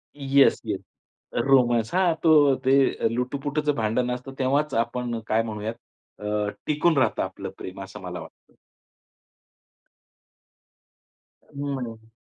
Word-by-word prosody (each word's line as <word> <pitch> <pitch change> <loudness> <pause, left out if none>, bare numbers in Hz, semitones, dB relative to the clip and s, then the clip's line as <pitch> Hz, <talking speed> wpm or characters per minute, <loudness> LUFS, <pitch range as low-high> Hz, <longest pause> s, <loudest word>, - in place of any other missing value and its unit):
Yes, 140 -1 +4
yes. - - -2 0.7
Romance 120 -3 +3
हां. 180 -2 +3
तो 150 -4 +6
ते 135 -2 +3
लुटूपुटचं 145 +3 -1
भांडण 115 +3 0
असतं 125 +2 -5
तेव्हाच 140 +3 +1
आपण 120 0 -1
काय 110 +1 +2
म्हणूयात 110 0 -4 0.5
अ, 105 0 -1 0.2
टिकून 150 +1 +2
राहतं 120 -5 +2
आपलं - - -6
प्रेम 95 +1 -8
असं 95 - -10
मला 90 -1 -6
वाटतं. 80 - -14 3.0
हं. 125 -6 -5
125 Hz, 110 wpm, -25 LUFS, 110-140 Hz, 3.0 s, तो